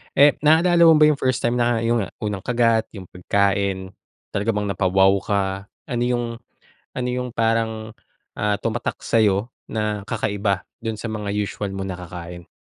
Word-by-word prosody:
Eh, 145 +1 +5
naalala 165 +3 +4
mo 160 - +8
ba 150 0 +6
yung 145 - -3
first 130 -1 0
time 120 +1 +1
na 120 -1 +1
yung 115 -4 +1 0.2
unang 105 -2 -2
kagat 115 0 +1
yung 95 - -7
pagkain 100 0 0 0.4
talaga 100 +3 -2
bang 105 - 0
napa-wow 95 +1 +3
ka? 100 0 0 0.5
Ano 120 -1 0
'yong 120 -1 0 0.7
ano 125 0 -2
'yong 125 -1 -4
parang, 115 -1 0 0.5
ah, 105 -1 +1
tumatak 115 +3 -3
sa'yo 110 0 +2 0.2
na 105 -2 -3
kakaiba 100 -3 -1 0.2
do'n 115 -1 -3
sa 110 +1 -5
mga 105 -1 -4
usual 100 -1 -3
mong 95 0 -4
nakakain? 85 -1 -9
110 Hz, 155 wpm, -22 LUFS, 100-120 Hz, 0.7 s, mo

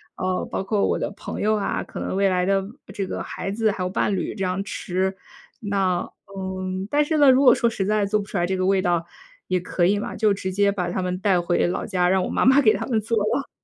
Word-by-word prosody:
呃， 185 0 -1
包 - - -3
括 200 +1 +1
我 - - +1
的 - - -2
朋 - - -7
友 215 +1 +2
啊， 205 - -2
可 - - -9
能 - - -3
未 195 +1 +3
来 180 -1 +1
的 195 0 +2
未 200 - -9 0.2
这 195 - -2
个 - - -4
孩 195 - -5
子 220 +1 +1
还 185 - -4
有 180 - -1
伴 195 +1 0
侣 185 - -3
这 195 - -3
样 185 +1 -1
吃。 190 0 -2 0.5
那 195 -4 0 0.3
嗯， 190 0 -4
但 295 +4 +3
是 315 +1 0
呢， 290 -2 +6
如 260 +1 +5
果 250 -3 +8
说 235 - +2
实 195 -4 -2
在 210 0 +1
做 210 +1 +1
不 200 - -5
出 200 - -5
来 175 0 +1
这 190 - -1
个 185 - 0
味 195 0 +3
道 175 -2 0 0.4
也 185 - +1
可 175 0 0
以 205 +2 +2
嘛， - - -5
就 215 -1 +2
直 190 -1 -4
接 200 +1 +2
把 180 -3 -2
他 185 - -2
们 180 0 -2
带 190 -2 +2
回 175 0 +1
老 175 - -2
家， 180 -3 +1
让 190 -1 +2
我 - - -3
妈 - - 0
妈 265 +2 +6
给 215 -4 +5
他 - - -3
们 225 -4 +1
做 230 +2 -1
了。 215 +6 0
195 Hz, 290 characters per minute, -23 LUFS, 185-210 Hz, 0.5 s, 果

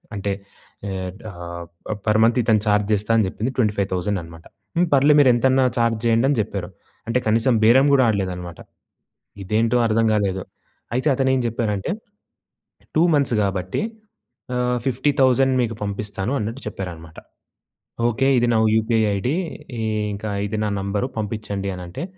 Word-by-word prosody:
అంటే 100 0 -2 0.6
ఆహ్, 95 -1 -4 0.8
ఆహ్, 105 - -3
పర్ 105 0 +3
మంత్ 115 +2 +3
ఇతను 110 -2 +3
ఛార్జ్ 105 0 +2
చేస్తా 105 +2 -1
అని 110 - +3
చెప్పింది 115 +7 -3
25,000 100 -3 0
అనమాట. 85 0 -13 0.3
హ్మ్, 175 0 +3
"పర్లే, 140 +2 +5
మీరెంతన్నా 130 0 +4
ఛార్జ్ 115 -1 +2
చేయండి" 115 +2 +3
అని 140 - +1
చెప్పారు. - - -5 0.4
అంటే, 115 +2 +1
కనీసం 115 +4 +3
బేరం 130 +5 +6
కూడా 130 - +5
ఆడలేదనమాట. 90 -5 -2 0.8
ఇదేంటో 115 +5 +1
అర్థం 115 +1 +2
కాలేదు. 95 -3 0 0.5
అయితే 130 +5 0
అతనేం 130 0 +2
చెప్పారంటే, 105 -4 -2 1.0
"2 160 - +5
మంత్స్ 140 -4 +1
కాబట్టి 95 - -2 0.7
ఆహ్, 125 0 +1
50,000 130 0 +2
మీకు 115 -2 -1
పంపిస్తాను" 100 +2 -3
అన్నట్టు 115 +5 -4
చెప్పారనమాట. 85 -5 -7 0.9
ఓకే, 135 +4 +1
ఇది 120 0 +2
నా - - +3 0.2
యూపీఐ 110 0 +2
ఐడీ, 125 +10 -1 0.8
ఇంకా 105 +1 -5 0.2
ఇది 105 +1 -3
నా - - 0
నంబర్ 100 +4 -1
పంపించండి 105 -2 -3
అని 90 - -7
అంటే, 85 - -6
110 Hz, 140 wpm, -22 LUFS, 100-125 Hz, 1.0 s, బేరం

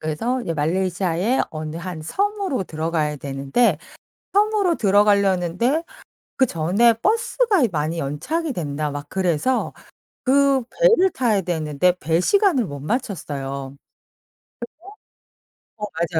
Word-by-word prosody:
그래서 225 +12 -2
이제 165 -5 -3
말레이시아의 180 - 0
어느 155 0 -6
한 170 -2 -6
섬으로 395 - -1
들어가야 155 -2 -2
되는데 140 - 0 0.6
섬으로 410 -4 +2
들어가려는데 200 - +2 0.5
그전에 230 - +3
"버스가 450 - +2
많이 155 +1 -2
연착이 260 - -2
된다." 150 - -3
막 145 0 -6
그래서 185 - 0 0.5
그 275 0 +3
배를 460 -7 +4
타야 230 - +1
되는데 165 -1 0
배 165 +2 +1
시간을 380 - +3
못 145 -3 -7
맞췄어요. 140 - -4 2.0
그래서 170 -5 -2
185 Hz, 260 characters per minute, -22 LUFS, 155-260 Hz, 2.0 s, 배를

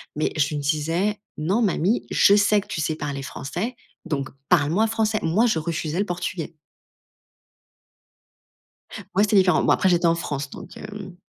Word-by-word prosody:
mais 155 - 0
je 150 - +3
lui 150 - -4
disais: 165 +8 0 0.2
«Non, 185 +10 0
mamie, 200 +1 +1
je 200 - +5
sais 205 0 +4
que - - -17
tu - - -4
sais 155 0 -1
parler 140 -3 -4
français, 175 - -5 0.3
donc 140 -5 -2 0.2
parle 150 -4 +3
moi 215 +6 +3
français». 220 -1 0
Moi, 180 +9 +3
je 215 -9 +2
refusais 160 +1 -3
le 205 - +1
portugais. 175 -2 -4 2.6
Ouais, 195 +3 +4
c'est 210 - +2
différent. 185 -2 +4
Bon - - +3
après, 190 - +3
j'étais 175 -1 +3
en 165 - +3
France, 145 -4 -4
donc, - - -11
hem 205 -4 -8
175 Hz, 170 wpm, -23 LUFS, 155-205 Hz, 2.6 s, je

